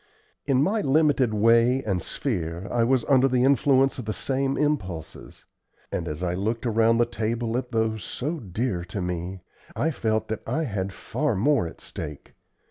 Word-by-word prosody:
In 135 -1 +3
my 210 +5 +1
limited 140 - +3
way 115 +4 +4
and 95 -4 -1
sphere 85 - -3
I 120 -1 +2
was 125 0 +2
under 135 -1 +4
the 125 -1 +2
influence 135 -1 +3
of 125 - -5
the 110 - -2
same 135 +2 -1
impulses; 95 - -3 0.5
and, - - -2
as 75 +3 -4
I 90 -1 0
looked 110 +6 -2
around 115 0 +3
the 120 - +4
table 115 0 -2
at 125 0 -3
those 110 -3 0
so 150 - -4
dear 100 -3 -2
to 95 +3 -5
me, 90 +1 -4 0.3
I 160 - +1
felt 110 -5 -1
that 110 - -3
I 160 - 0
had 100 -7 -2
far 145 +6 -2
more 120 - +2
at - - -11
stake. 75 -3 -8
115 Hz, 175 wpm, -25 LUFS, 95-135 Hz, 0.5 s, way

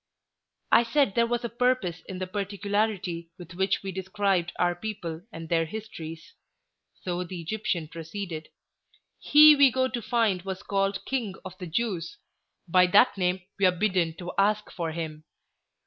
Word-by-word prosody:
"I - - +7
said 235 -1 +2
there 235 +2 +3
was 240 0 -1
a - - +1
purpose 235 -8 0
in 190 - -5
the 185 - -3
particularity 200 -3 -2
with 175 -1 -11
which 190 +2 0
we 195 - -4
described 190 -1 0
our 175 0 +2
people 175 -4 -5
and 165 -4 -8
their 165 0 +2
histories," 165 -5 -8 0.7
so 180 0 -2
the 180 0 -7
Egyptian 170 -2 -2
proceeded. 165 0 -6 0.7
"He 300 +1 +8
we 280 -2 +6
go 260 +1 +1
to 245 -2 -4
find 220 -4 +1
was 190 0 -6
called 195 0 -1
'King 235 -8 -2
of 185 0 -8
the 180 - -6
Jews;' 175 -2 -2 0.5
by 180 +1 +5
that 205 +7 +5
name 180 -1 0 0.2
we 200 - +4
are - - +5
bidden 180 -3 0
to 175 0 -6
ask 210 +1 +2
for 165 -2 -3
him. 155 -2 -5
190 Hz, 165 wpm, -27 LUFS, 170-215 Hz, 0.7 s, He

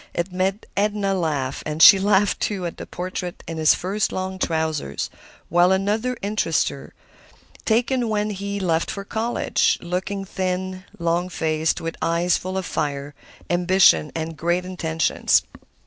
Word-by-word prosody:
It 170 +2 -2
made 190 +3 -1
Edna 205 -1 +1
laugh, 150 -7 -1
and 150 0 -4
she 195 +4 +10
laughed, 200 0 +2
too, 195 -4 -2
at 170 - -5
the - - -8
portrait 180 0 -5
in 165 - -5
his 155 -1 +5
first 195 +3 -1
long 185 0 -4
trousers; 160 - -2 0.4
while 175 +2 +4
another 210 +6 0
interested 200 -6 +1
her, 140 - -11 0.7
taken 240 +1 +1
when 210 0 0
he 200 0 -4
left 170 -3 0
for 200 - -4
college, 225 +3 0
looking 190 +3 -3
thin, 185 0 -3
long 170 +1 0
faced, 160 -2 0
with 165 0 -4
eyes 170 +2 +2
full 185 +1 -3
of 190 - -2
fire, 145 -2 -3 0.3
ambition 175 - +4
and 160 0 -3
great 175 +4 0
intentions. 165 -4 +1
180 Hz, 145 wpm, -22 LUFS, 165-195 Hz, 0.7 s, she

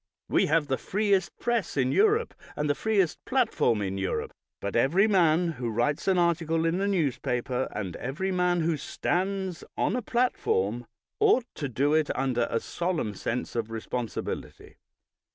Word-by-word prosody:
We - - +2
have 160 0 +3
the 135 -2 -1
freest 200 -3 0
press 235 -10 -1
in 130 -1 +2
Europe, 435 +2 +3 0.2
and 150 - -1
the 145 - +3
freest 195 0 0
platform 125 - +1
in 95 0 -3
Europe, 95 - -2 0.3
but 100 - -4
every 150 - +4
man 175 -4 +3
who 120 - -1
writes 120 - 0
an 190 -1 +3
article 165 -2 +1
in 170 +3 +1
a 200 - +1
newspaper, 130 -7 0
and 95 -5 -4
every 160 +9 -3
man 180 -1 +2
who 160 -1 +1
stands 185 +4 -2
on - - +1
a 250 - -1
platform, 120 - 0 0.3
ought 410 - +4
to 145 -3 -4
do 140 +5 +1
it 155 -1 +2
under 125 -3 +1
a 115 - 0
solemn 170 - -2
sense 120 +6 -3
of 115 -2 -1
responsibility. 115 +1 -5
160 Hz, 160 wpm, -27 LUFS, 125-190 Hz, 0.3 s, every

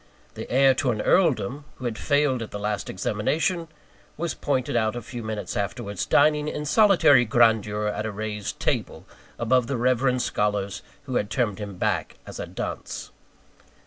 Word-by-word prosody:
The - - -8
heir 135 +1 +5
to 130 0 0
an 110 -3 0
Earldom, 145 - +2
who 130 - -9
had 120 -2 -2
failed 145 0 +1
at 115 - -5
the - - -6
last 105 0 -3
examination, 155 - -1 0.5
was 165 0 -2
pointed 130 -4 -1
out 110 -1 +1
a 120 - -4
few 120 +1 -7
minutes 110 -4 -4
afterwards, 100 +1 -3
dining 150 0 +4
in 150 0 -3
solitary 150 - +5
grandeur 110 -2 +2
at 105 +1 -2
a - - -3
raised 105 0 -5
table, - - -2 0.3
above 120 +1 +2
the 135 - -1
reverend 125 +1 +2
scholars 105 -1 -1 0.2
who 130 -3 -2
had 105 - -1
turned 110 -6 -1
him 100 -3 -6
back - - -1
as - - -9
a - - -4
dunce. - - -6
120 Hz, 170 wpm, -25 LUFS, 105-140 Hz, 0.5 s, heir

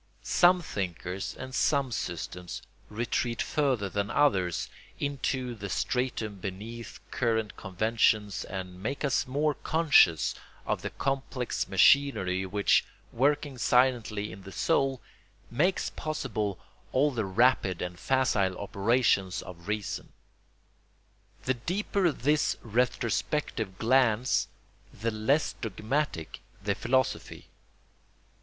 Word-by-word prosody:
Some 180 0 +4
thinkers 90 - -4
and 130 0 -7
some 140 -2 +2
systems 90 -3 -5 0.3
retreat 115 +1 -1
further 130 -9 +1
than 100 +1 -2
others 95 - +2 0.3
into 130 -3 -2
the 105 -3 -6
stratum 115 -3 -1
beneath 105 +5 -7
current 110 -4 0
conventions 105 0 +1
and 90 -1 -7
make 135 +7 -2
us 135 0 +1
more 145 +3 +1
conscious 145 - +4 0.3
of - - -1
the - - -3
complex 135 -2 -2
machinery 95 -5 +4
which, 100 +2 +3 0.3
working 140 +1 +1
silently 120 -5 +2
in 100 - -10
the 95 - -10
soul, 135 - +1 0.5
makes 170 +10 +1
possible 110 - -3 0.3
all 145 +3 +3
the 115 -4 -1
rapid 95 -2 +2
and 90 0 -5
facile 110 -9 +1
operations 100 -2 +1
of 85 -1 -11
reason. 105 -1 -3 1.3
The 130 - +1
deeper 180 - 0
this 145 +3 +1
retrospective 115 -2 -1
glance 125 0 +3 0.4
the 115 +3 -2
less 110 +8 +1
dogmatic 110 - -3 0.2
the 100 +1 0
philosophy. 130 +5 -1
115 Hz, 105 wpm, -29 LUFS, 100-135 Hz, 1.3 s, Some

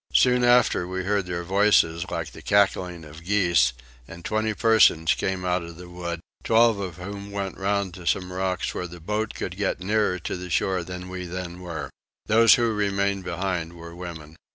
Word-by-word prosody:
Soon 125 -1 +5
after 120 -7 +4
we 95 0 -3
heard 100 -1 0
their 85 -1 -3
voices 95 -3 +3
like - - -4
the - - -12
cackling 90 -4 +1
of 75 +2 -12
geese, 85 -9 +3 0.4
and 85 +1 -11
twenty 110 0 0
persons 110 -8 +4
came 95 -1 -2
out 90 0 +1
of 85 0 -9
the 90 0 -10
wood, 85 -1 -5 0.2
twelve 115 -2 +4
of 90 -4 -5
whom 100 +2 -7
went 100 -1 -4
round 100 -1 -1
to 90 -2 -9
some 90 -1 0
rocks 95 -1 -2
where 90 - -4
the 90 0 -11
boat 105 +5 -2
could 90 - -4
get 100 -1 -1
nearer 105 0 +1
to 85 - -4
the 90 0 -7
shore 90 +2 0
than 90 +1 -7
we 90 0 -6
then 90 0 -6
were. 85 -5 -6 0.3
Those 115 +1 +6
who 120 -2 +1
remained 100 -1 0
behind 85 -2 -3
were 85 0 -10
women. 80 -3 -9
90 Hz, 190 wpm, -25 LUFS, 85-100 Hz, 0.4 s, Those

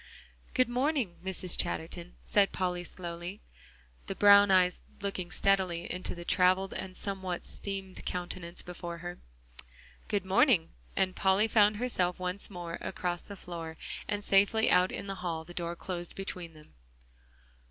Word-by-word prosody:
"Good 255 - +4
morning, 250 - 0
Mrs. 185 -1 -1
Chatterton," 170 +2 -3
said 200 -1 +3
Polly 180 -1 -1
slowly, 175 +2 -6 0.7
the - - -3
brown 205 0 +8
eyes 185 -2 +4 0.2
looking 195 -3 -3
steadily 185 -3 +2
into 180 0 -3
the 175 0 -8
traveled 185 +2 +3
and 185 -1 -5
somewhat 190 -3 -3
seamed 195 -2 -4
countenance 175 -1 -4
before 175 -1 -6
her. 175 0 -5 0.9
"Good 200 -3 0
morning," 195 - +4 0.2
and 185 -1 +1
Polly 195 +3 +4
found 210 -1 +5
herself 185 -7 0
once 185 +2 -2
more 175 -3 -6
across 175 -2 -2
the 200 - -9
floor, 165 -3 -7 0.3
and 205 0 -2
safely 205 +3 +4
out 180 +1 +5
in - - -4
the 195 - -3
hall, 165 -3 -2
the 175 - -10
door 170 -1 -3
closed 175 -1 -5
between 180 -4 -6
them. 150 - -17
185 Hz, 145 wpm, -31 LUFS, 175-200 Hz, 0.9 s, brown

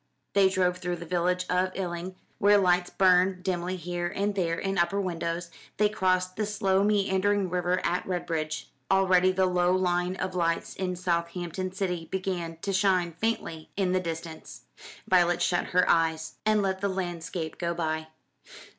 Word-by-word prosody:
They 195 -1 +5
drove 180 -1 +1
through 180 -1 -2
the 175 - -8
village 180 +1 0
of 185 +1 +1
Eling, 180 0 -4 0.2
where 205 +1 +6
lights 180 -2 +2
burned 185 0 +3
dimly 180 -1 -1
here 175 0 -3
and 200 +3 -1
there 170 -4 0
in 195 -2 -1
upper 185 +4 +1
windows; 170 -2 -3 0.3
they 210 0 +3
crossed 185 -2 0
the 210 -1 0
slow 195 -2 +1
meandering 200 -2 +1
river 180 0 +1
at 175 +1 0
Redbridge. 165 -4 -2 0.2
Already 185 -1 +4
the 190 0 +2
low 180 0 +2
line 180 0 0
of 185 0 -3
lights 165 -2 -1
in 185 -1 -2
Southampton 175 +1 -2
city 180 -4 -2
began 180 -3 -3
to 200 - -1
shine 185 -2 +2
faintly 165 -4 -3
in 190 -2 +1
the 185 - +2
distance. 165 -2 -7 0.5
Violet 175 -2 +4
shut 175 - +1
her 180 0 +2
eyes 160 -1 +1
and 215 -1 +3
let 190 -1 -1
the 200 - +1
landscape 175 -3 -4
go 170 -1 -1
by. 160 -1 -2
180 Hz, 165 wpm, -27 LUFS, 175-190 Hz, 0.5 s, where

